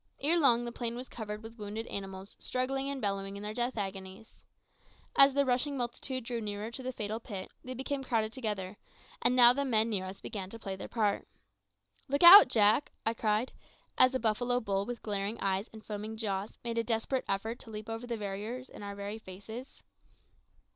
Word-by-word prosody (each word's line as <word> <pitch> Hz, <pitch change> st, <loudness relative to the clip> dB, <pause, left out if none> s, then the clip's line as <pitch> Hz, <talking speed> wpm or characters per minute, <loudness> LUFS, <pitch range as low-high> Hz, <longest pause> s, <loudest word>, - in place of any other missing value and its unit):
Ere 330 Hz, +4 st, +3 dB
long 240 Hz, -5 st, +4 dB
the 240 Hz, -, -4 dB
plain 235 Hz, -1 st, -3 dB
was 250 Hz, +2 st, -6 dB
covered 215 Hz, -1 st, -6 dB
with 225 Hz, +1 st, -11 dB
wounded 210 Hz, +2 st, -4 dB
animals 195 Hz, -2 st, -6 dB
struggling 270 Hz, +2 st, -1 dB
and 280 Hz, -1 st, -4 dB
bellowing 195 Hz, 0 st, -2 dB
in 200 Hz, -, -8 dB
their 210 Hz, 0 st, -4 dB
death 240 Hz, +1 st, -1 dB
agonies. 195 Hz, +1 st, -6 dB, 0.7 s
As 275 Hz, 0 st, +8 dB
the 280 Hz, 0 st, +3 dB
rushing 260 Hz, +3 st, +1 dB
multitude 255 Hz, +1 st, -3 dB
drew 235 Hz, 0 st, -3 dB
nearer 210 Hz, +1 st, -4 dB
to 250 Hz, -, -7 dB
the 255 Hz, 0 st, -3 dB
fatal 215 Hz, -2 st, -3 dB
pit, 200 Hz, -5 st, -7 dB
they 255 Hz, 0 st, -6 dB
became 270 Hz, +2 st, -3 dB
crowded 225 Hz, -3 st, 0 dB
together, 210 Hz, -6 st, -3 dB, 0.4 s
and 250 Hz, -, +3 dB
now 245 Hz, -1 st, +8 dB
the 280 Hz, +2 st, -1 dB
men 225 Hz, -4 st, +2 dB
near 190 Hz, -3 st, -1 dB
us 190 Hz, +1 st, -7 dB
began 190 Hz, -3 st, -6 dB
to 230 Hz, -, -8 dB
play 195 Hz, -4 st, -5 dB
their 190 Hz, -, -7 dB
part. 210 Hz, -4 st, 0 dB, 0.8 s
"Look 280 Hz, +4 st, 0 dB
out, 385 Hz, +4 st, +12 dB
Jack!" 215 Hz, +5 st, +3 dB
I 225 Hz, -, +2 dB
cried, 220 Hz, +2 st, 0 dB, 0.4 s
as 255 Hz, +1 st, +5 dB
a -, -, +1 dB
buffalo 245 Hz, +2 st, +1 dB
bull 200 Hz, -3 st, -1 dB
with 245 Hz, -1 st, -5 dB
glaring 205 Hz, +1 st, -2 dB
eyes 195 Hz, +1 st, -1 dB
and 220 Hz, -1 st, -12 dB
foaming 215 Hz, +1 st, -5 dB
jaws 200 Hz, -2 st, -3 dB
made 230 Hz, -1 st, -1 dB
a -, -, +1 dB
desperate 230 Hz, +3 st, -1 dB
effort 220 Hz, +5 st, -2 dB
to -, -, -11 dB
leap 215 Hz, 0 st, -7 dB
over 225 Hz, +2 st, -5 dB
the 235 Hz, -1 st, -2 dB
barrier 210 Hz, +5 st, -4 dB
in -, -, -10 dB
our 200 Hz, 0 st, -6 dB
very 200 Hz, +2 st, -5 dB
faces. 220 Hz, +6 st, -10 dB
225 Hz, 200 wpm, -31 LUFS, 205-250 Hz, 0.8 s, out